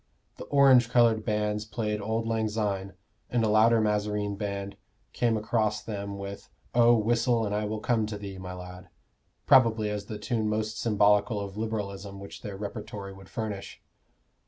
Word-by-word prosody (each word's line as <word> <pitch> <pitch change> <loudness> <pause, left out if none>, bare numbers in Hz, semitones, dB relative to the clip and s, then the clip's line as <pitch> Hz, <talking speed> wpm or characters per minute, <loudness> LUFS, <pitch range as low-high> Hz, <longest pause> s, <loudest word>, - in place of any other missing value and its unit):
The - - -8
orange 135 -4 +5
colored 115 -3 +4
bands 105 0 -1
played 105 -1 -3
"Auld 110 +2 -1
Lang 110 -1 0
Syne," 100 -3 -2 0.4
and 120 -2 +1
a - - +3
louder 110 +2 +5
mazarine 105 -1 0
band 100 -1 -4 0.4
came 115 -2 +1
across 110 -1 0
them 100 -2 -5
with 100 0 -7 0.2
"Oh, 120 0 +6
whistle 115 +1 +2
and 105 - -2
I 105 0 0
will 110 +1 -3
come 115 -3 +1
to 105 -1 -5
thee, 100 -2 -7
my 90 -1 -7
lad" 90 0 -10 0.6
probably 110 -4 +5
as 105 -1 -4
the 105 - -6
tune 110 +2 -1
the 105 - 0
most 110 0 -3
symbolical 105 0 +3
of 100 -1 -6
Liberalism 100 -3 -4
which 100 - -10
their 100 -2 -6
repertory 100 -1 -6
would 95 0 -14
furnish. 105 -3 -5
105 Hz, 170 wpm, -28 LUFS, 100-110 Hz, 0.6 s, Oh